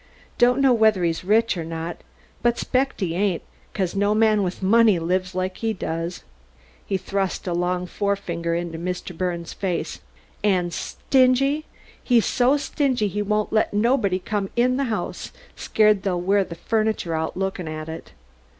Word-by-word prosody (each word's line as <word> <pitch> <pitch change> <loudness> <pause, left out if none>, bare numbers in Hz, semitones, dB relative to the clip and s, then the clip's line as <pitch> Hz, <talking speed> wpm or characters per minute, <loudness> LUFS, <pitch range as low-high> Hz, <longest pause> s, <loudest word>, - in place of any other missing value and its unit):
Don't 245 +2 +4
know 270 -2 +5
whether 220 -5 +3
he's 165 0 0
rich 220 +3 +3
or 170 - -3
not, 165 +1 -5 0.4
but 240 0 +2
'spect 265 -1 -1
he 175 -4 0
ain't 190 -1 0 0.3
becuz 190 -3 -2
no 205 +1 +2
man 215 -1 +4
with 185 0 -3
money'd 210 -3 +4
live 185 +2 -1
like 185 0 -2
he 225 -1 -1
does." 170 -2 -4 0.6
He 195 - -1
thrust 195 0 -2
a 180 - -1
long 180 +1 0
forefinger 175 -4 -2
into 170 -1 -4
Mr. 180 0 -4
Birnes' 170 -1 -3
face. 185 -4 -3 0.4
"And 180 -4 +1
stingy! 275 +3 +2 0.4
He's 240 -3 +3
so 255 +3 +3
stingy 260 -7 0
he 210 +2 -2
won't 210 +1 -1
let 215 -1 +1
nobody 210 -3 +2
come 195 +1 -3
in 250 +1 +2
the 275 - 0
house 225 -3 -4 0.2
scared 215 -2 +3
they'll 185 -2 -1
wear 195 +3 +2
the 170 - -8
furniture 215 -2 -1
out 160 +1 -2
looking 190 -2 -2
at 155 0 -5
it." 160 0 -8
195 Hz, 165 wpm, -23 LUFS, 175-220 Hz, 0.6 s, know